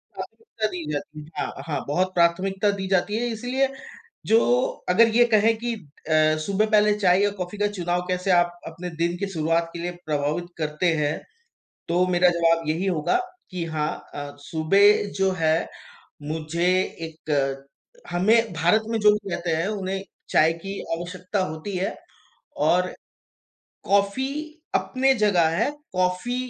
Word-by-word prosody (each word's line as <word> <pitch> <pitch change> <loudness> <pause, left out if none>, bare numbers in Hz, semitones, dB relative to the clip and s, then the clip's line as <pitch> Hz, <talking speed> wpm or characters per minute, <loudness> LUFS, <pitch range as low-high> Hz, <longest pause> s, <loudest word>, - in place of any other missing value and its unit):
प्राथमिकता 455 - -10
दी 180 - -4
जाती 150 +1 -5
है। 155 - -5
हाँ, - - -6
हाँ 145 -4 -2
बहुत 185 +5 0
प्राथमिकता 190 +4 +2
दी 190 0 -3
जाती 195 +2 +1
है 240 +1 -1
इसलिए 250 +4 0 0.6
जो 225 +2 +5 0.5
अगर 230 +5 +6
ये 240 - +7
कहें 220 +2 +4
कि 240 +1 -2
अ, 155 -3 0
सुबह 200 +2 +2
पहले 210 0 +4
चाय 185 -1 +4
या 205 - +2
कॉफ़ी 180 +3 -5
का 205 - +2
चुनाव 175 0 0
कैसे 180 +1 -1
आप 175 0 +3
अपने 175 +2 -6
दिन 170 +1 +1
की 200 - -2
शुरुआत 165 +1 0
के 170 - -7
लिए 175 +1 -3 0.2
प्रभावित 150 +3 -1
करते 155 +3 0
हैं? 150 0 -1 0.7
तो 180 +2 +2
मेरा 180 0 +4
जवाब 165 -2 +2
यही 165 +5 0
होगा 175 - +1 0.3
कि 175 -2 -3
हाँ 150 0 0 0.2
अ, 145 0 -6
सुबह 195 +8 +4 0.2
जो 195 0 +3
है 160 +1 +2 0.6
मुझे 160 +3 -2 0.4
एक 140 -4 -2 0.4
हमें 220 +6 +3
भारत 215 +1 +3
में 225 -1 0
जो 210 0 +7
भी 205 -2 -3
कहते 170 0 -2
हैं 165 +4 0
उन्हें 195 -2 -3 0.3
चाय 160 +1 +4
की 195 +1 -5 0.2
आवश्यकता 180 +3 -4
होती 160 +5 -5
है 190 +2 -2 0.7
और 180 +1 +2 0.9
कॉफ़ी 200 +6 +2 0.5
अपने 265 +1 +2
जगह 180 -6 +4
है, 230 +6 +2 0.2
कॉफ़ी 185 +6 0
180 Hz, 155 wpm, -24 LUFS, 160-205 Hz, 0.9 s, ये